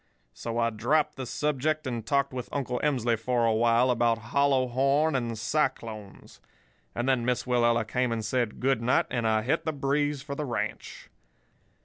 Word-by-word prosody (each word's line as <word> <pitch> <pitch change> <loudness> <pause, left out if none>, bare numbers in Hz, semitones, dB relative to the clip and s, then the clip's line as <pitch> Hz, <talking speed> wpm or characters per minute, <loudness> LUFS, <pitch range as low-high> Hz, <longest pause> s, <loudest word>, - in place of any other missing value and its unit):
So 115 - -5
I 115 0 +1
dropped 150 +8 +1
the 130 -1 -6
subject 150 +3 -1
and 120 -3 -3
talked 140 +3 0
with 125 -1 -5
Uncle 130 -3 -2
Emsley 125 -6 +1
for 120 0 +1
a 115 - +3
while 120 +3 +3
about 115 -1 +2 0.2
hollow 140 -2 +3
horn 140 +5 +2
and 120 -3 -2
cyclones. 110 -4 -3 0.5
And 120 - -2
then 130 -3 +2
Miss 125 0 0
Willella 120 -2 +2
came 125 +1 0
and 110 -2 -2
said 120 -3 -1
'Good 130 -2 +1
night,' 125 +2 +2
and 120 -3 0
I 110 -1 +2
hit 125 - 0
the 160 - -1
breeze 145 0 -1
for 140 -1 -5
the 150 - -3
ranch. 125 -5 -5
125 Hz, 175 wpm, -27 LUFS, 115-140 Hz, 0.5 s, a